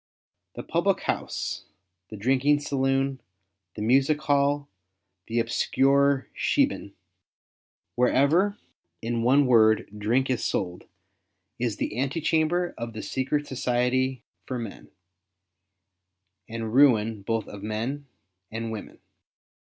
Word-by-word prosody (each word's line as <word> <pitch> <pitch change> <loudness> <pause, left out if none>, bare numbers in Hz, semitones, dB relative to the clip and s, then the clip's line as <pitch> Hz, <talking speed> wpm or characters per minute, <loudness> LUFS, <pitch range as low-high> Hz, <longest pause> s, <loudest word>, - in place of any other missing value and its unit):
The - - -6
public - - +1
house, - - -3 0.4
the 110 - -8
drinking 135 +6 +2
saloon, 135 -1 0 0.5
the 105 - -4
music 135 +6 +3
hall, 140 0 +1 0.6
the 115 - -3
obscure 135 +4 +2
"shebeen," 270 - 0 1.0
wherever, 150 +11 +3 0.5
in 115 0 -1
one 135 +4 +4
word, 110 -3 +4
drink 115 +6 +1
is 125 - -1
sold, 90 -2 -2 0.7
is 115 -4 -1
the - - -3
ante 135 +5 -1
chamber 165 +3 +1
of 115 0 -5
the 110 - -6
secret 135 +3 -1
society 130 0 0 0.2
for 130 - -3
men, 115 -4 -8 1.6
and 115 -1 -4
ruin 115 -6 +4
both 115 +2 -2
of 100 - -9
men 115 +7 -3 0.4
and 115 0 -4
w^omen. 105 - -8
130 Hz, 110 wpm, -26 LUFS, 115-140 Hz, 1.6 s, one